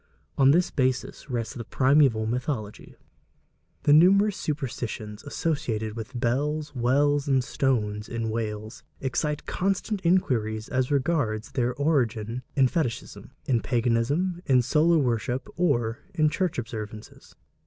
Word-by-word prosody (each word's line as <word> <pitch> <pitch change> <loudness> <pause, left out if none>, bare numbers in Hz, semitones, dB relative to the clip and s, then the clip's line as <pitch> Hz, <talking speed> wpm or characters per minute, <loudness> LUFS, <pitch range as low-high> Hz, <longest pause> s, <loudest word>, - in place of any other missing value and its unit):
On 135 -1 +5
this 175 +5 +3
basis 130 +1 -1
rests 120 -1 -3
the 120 -4 -6
primeval 130 -4 +3
mythology. 115 -2 -4 0.9
The 145 - +5
numerous 195 +6 +5
superstitions 120 -7 -4
associated 120 -8 -2
with 120 +2 -6
bells, 145 +5 -1
wells 140 +3 +2
and 135 -2 +3
stones 105 -6 -1
in 115 -2 -3
Wales, 110 0 -4 0.2
excite 150 +3 -2
constant 195 +2 -1
inquiries 115 -11 +1
as 130 -1 0
regards 140 -7 0
their 125 -2 0
origin 125 -6 0
in 135 -2 +5
fetichism, 125 -4 -3 0.2
in 120 -4 +1
paganism, 130 +9 0
in 130 -3 +4
solar 160 +6 +3
worship, 125 -1 -1
or 120 -10 +1 0.2
in 155 -2 +3
church 185 -2 -1
observances. 110 -3 -7
130 Hz, 120 wpm, -26 LUFS, 115-150 Hz, 0.9 s, On